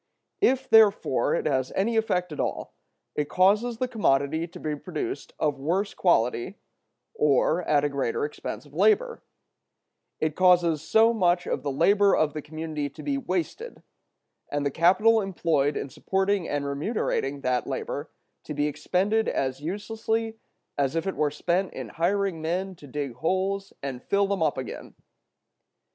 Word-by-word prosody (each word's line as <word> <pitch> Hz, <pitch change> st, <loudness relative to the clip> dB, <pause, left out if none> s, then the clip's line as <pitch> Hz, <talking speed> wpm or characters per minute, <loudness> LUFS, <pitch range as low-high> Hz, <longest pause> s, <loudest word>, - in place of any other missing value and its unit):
If, 265 Hz, -8 st, +2 dB
therefore, 205 Hz, -, +4 dB
it -, -, -2 dB
has 130 Hz, -3 st, 0 dB
any 225 Hz, +4 st, +1 dB
effect 180 Hz, -6 st, 0 dB
at 150 Hz, -, -7 dB
all, -, -, -3 dB, 0.4 s
it 150 Hz, -1 st, -2 dB
causes 210 Hz, +6 st, +3 dB
the 255 Hz, -, -1 dB
commodity 160 Hz, -, +1 dB
to 180 Hz, +1 st, -12 dB
be 155 Hz, -2 st, -2 dB
produced 150 Hz, -2 st, -5 dB
of 145 Hz, -3 st, 0 dB
worse 180 Hz, +8 st, -1 dB
quality, 120 Hz, -9 st, +1 dB, 0.6 s
or 150 Hz, +4 st, +2 dB
at 145 Hz, -1 st, +3 dB
a 145 Hz, -, +1 dB
greater 140 Hz, -2 st, -1 dB
expense 150 Hz, -, -6 dB
of 145 Hz, -, -18 dB
labor; 335 Hz, -, +2 dB, 1.0 s
it 155 Hz, -1 st, -1 dB
causes 175 Hz, -4 st, +4 dB
so 225 Hz, +8 st, +4 dB
much 175 Hz, -5 st, +2 dB
of -, -, -2 dB
the 145 Hz, -, -2 dB
labor 200 Hz, +8 st, +4 dB
of 150 Hz, -1 st, +1 dB
the 155 Hz, -, -4 dB
community 155 Hz, -1 st, -4 dB
to -, -, -12 dB
be 280 Hz, -1 st, -1 dB
wasted, 230 Hz, -, -4 dB, 0.7 s
and 145 Hz, 0 st, -1 dB
the 140 Hz, -, +1 dB
capital 210 Hz, +9 st, +4 dB
employed 165 Hz, -7 st, 0 dB
in -, -, -3 dB
supporting 190 Hz, +5 st, -1 dB
and 145 Hz, -1 st, -1 dB
remunerating 140 Hz, -, -2 dB
that 125 Hz, -2 st, 0 dB
labor 140 Hz, +2 st, -4 dB, 0.4 s
to 150 Hz, -, -5 dB
be 145 Hz, 0 st, +1 dB
expended 195 Hz, +8 st, 0 dB
as 130 Hz, 0 st, -2 dB
uselessly 220 Hz, +5 st, -3 dB, 0.4 s
as 140 Hz, +2 st, +1 dB
if 165 Hz, -, -1 dB
it 195 Hz, -, -2 dB
were 150 Hz, -, +1 dB
spent 175 Hz, +5 st, -1 dB
in 130 Hz, -4 st, -6 dB
hiring 180 Hz, -, 0 dB
men 185 Hz, +4 st, -2 dB
to 150 Hz, -5 st, -14 dB
dig 140 Hz, -1 st, -4 dB
holes 190 Hz, +5 st, -1 dB
and 130 Hz, -3 st, -4 dB
fill 200 Hz, +7 st, +1 dB
them 195 Hz, -2 st, -2 dB
up 155 Hz, -4 st, +1 dB
again. 130 Hz, -, -7 dB
170 Hz, 160 wpm, -26 LUFS, 145-200 Hz, 1.0 s, therefore